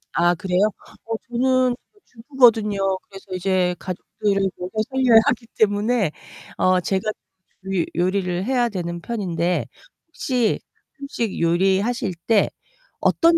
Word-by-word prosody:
아 175 +1 +3
그래요? 180 0 -1 0.5
어 225 0 -2
저는 255 +1 +2
어 - - -2 0.3
주부거든요. 230 -4 +2 0.3
그래서 195 -1 -12
이제 185 -1 +1
가족들을 195 +2 -1
먹여 180 +1 -6 0.2
살려야 260 -4 +5
하기 230 - 0
때문에 210 -2 +2 0.5
어 185 0 +3
제가 190 +2 -1 0.6
이 190 -3 0
요리를 180 +1 0
해야 245 -1 +1
되는 170 -3 -4
편인데 180 -6 -1 0.4
혹시 250 -8 0 0.4
음식 235 -7 -3
요리하실 190 +5 +1
때 225 -3 +4 0.5
어떤 335 -1 +4
200 Hz, 255 characters per minute, -22 LUFS, 180-240 Hz, 0.6 s, 살려야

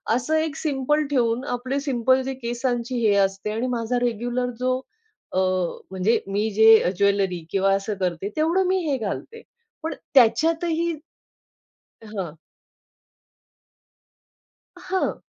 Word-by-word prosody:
असं 255 +6 0
एक 315 -2 0
सिम्पल 295 +1 0
ठेऊन 245 -3 +1
आपले 260 +3 -2
सिम्पल 260 -2 +2
जे 265 +1 -3
केसांची 245 0 -2
हे 215 -3 +3
असते 195 +2 -2
आणि 225 +4 -2
माझा 245 0 -1
रेग्युलर 245 +1 -1
जो 255 0 +1 0.5
अ, 185 - +1 0.5
म्हणजे 190 +4 +1
मी 205 +3 0
जे 220 -2 +6
ज्वेलरी 195 -4 +1
किंवा 195 0 +2
असं 195 +2 -2
करते 180 +1 -2
तेवढं 335 +5 +2
मी 375 - +2
हे 280 -2 +1
घालते 255 - -5 0.4
पण 320 - -2 0.2
त्याच्यातही 325 +6 +3 1.1
हां. 195 -7 -6 2.4
हां. 375 0 -2
245 Hz, 115 wpm, -23 LUFS, 210-275 Hz, 2.4 s, जे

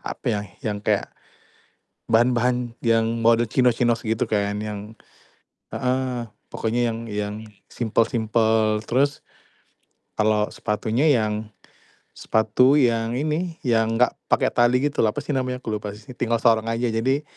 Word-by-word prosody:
apa - - -7
ya, 105 - -1 0.2
yang 105 -2 -2
kayak 105 -1 -1 1.0
bahan-bahan 120 +1 +2
yang 115 0 +1
model 115 0 +4
chinos-chinos 120 0 +2
gitu 110 0 -1
kan. 105 -1 -1
Yang 105 +1 -7 0.8
heeh, 125 -2 -1 0.2
pokoknya 120 +2 -1
yang 115 0 -4
yang 105 0 -3 0.3
simpel-simpel 110 -1 +1
terus, 140 +3 +1 1.0
kalau 105 0 +2
sepatunya 115 +6 0
yang, 110 -3 0 0.7
sepatu 110 +5 +3
yang 115 -2 +1
ini, 155 +4 -2
yang 115 -2 +2
enggak 125 - +4 0.2
pakai - - +3
tali 120 +1 +4
gitu 145 -1 -1
loh 110 - +3
apa - - -2
sih - - -4
namanya 130 -1 -1
ke - - -5
lupa 105 -1 -3
sih 110 +4 -13
tinggal 115 -2 0
sorong 115 -1 +3
aja, 115 +1 0
jadi 130 +6 0
115 Hz, 135 wpm, -23 LUFS, 110-125 Hz, 1.0 s, model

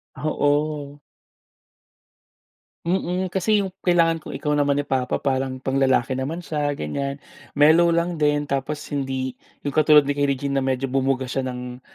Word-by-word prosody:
Oo. 145 0 -1 1.9
Mm. 180 +1 -1
Kasi 205 +3 +2
yung 190 -2 -6
"Kailangan 165 -2 +3
Ko'y - - -7
Ikaw" 150 0 -1
naman 145 -1 +2
ni 145 - -1
papa 130 -2 0
parang 130 -1 -1
panglalaki 130 -1 +1
naman 140 +7 -3
siya, 145 -2 -1
ganyan. 140 - -3 0.4
Mellow 160 +4 +6
lang 170 -1 0
din 145 0 +2
tapos 140 +2 -2 0.2
hindi 130 -2 -2 0.3
yung 145 - -2
katulad 150 -1 +6
ni 145 - 0
kay 145 0 +1
Regine 140 0 0
na - - -2
medyo 130 0 0
bumuga 135 0 0
siya 130 +2 -2
ng, 125 0 -6
145 Hz, 150 wpm, -23 LUFS, 135-155 Hz, 1.9 s, Mellow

